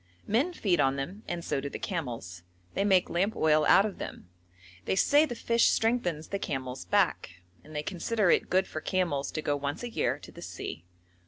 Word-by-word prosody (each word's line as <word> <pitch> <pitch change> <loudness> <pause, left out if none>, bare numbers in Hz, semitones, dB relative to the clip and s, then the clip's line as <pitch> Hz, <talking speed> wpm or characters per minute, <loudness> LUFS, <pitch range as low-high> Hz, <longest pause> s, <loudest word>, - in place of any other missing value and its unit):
Men 255 - +1
feed 195 - +1
on 135 0 +3
them 175 +10 -5
and 170 -1 -4
so 135 - -1
do 140 - -4
the - - -6
camels; 120 - -5 0.3
they 195 - 0
make 190 -3 +4
lamp 190 +6 0
oil 155 -1 +3
out 195 - +7
of 210 - -5
them; - - -7 0.6
they - - +1
say 295 +9 +4
the 240 - -5
fish 235 0 +3
strengthens 180 -9 +1
the 200 - -2
camel's 130 -6 -4
back, 165 - 0 0.2
and 155 0 -13
they 150 - -2
consider 195 +3 +1
it - - +2
good 190 +1 +3
for 155 - -5
camels 170 -6 0
to 155 - -4
go 145 - +1
once 145 +7 -3
a 240 - -4
year - - 0
to - - -13
the - - -12
sea. 80 - -7
175 Hz, 210 wpm, -29 LUFS, 145-205 Hz, 0.6 s, out